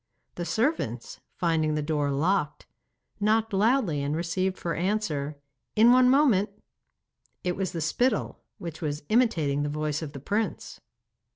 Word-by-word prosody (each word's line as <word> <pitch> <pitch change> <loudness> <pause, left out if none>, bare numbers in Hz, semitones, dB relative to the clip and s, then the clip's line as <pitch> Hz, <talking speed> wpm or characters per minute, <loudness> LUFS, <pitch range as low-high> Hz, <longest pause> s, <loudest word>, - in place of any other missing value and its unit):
The 175 - -5
servants, 170 - -1 0.2
finding 160 -3 +1
the 150 - -1
door 145 -1 0
locked, 150 +2 0 0.5
knocked 215 +1 +1
loudly 205 - +2
and 145 +2 -1
received 185 +3 -1
for 170 - -3
answer, 165 -7 -1 0.4
'In 225 +2 +6
one 250 0 +6
moment.' 255 -8 +4 0.9
It 180 -1 -1
was 190 -2 -2
the 165 - -4
spittle, 245 +11 0 0.2
which 165 -2 -7
was 150 -2 -3
imitating 165 - +2
the 145 - -1
voice 150 0 -2
of 155 -2 -6
the 140 - -7
prince. 205 +9 -3
170 Hz, 145 wpm, -27 LUFS, 150-215 Hz, 0.9 s, In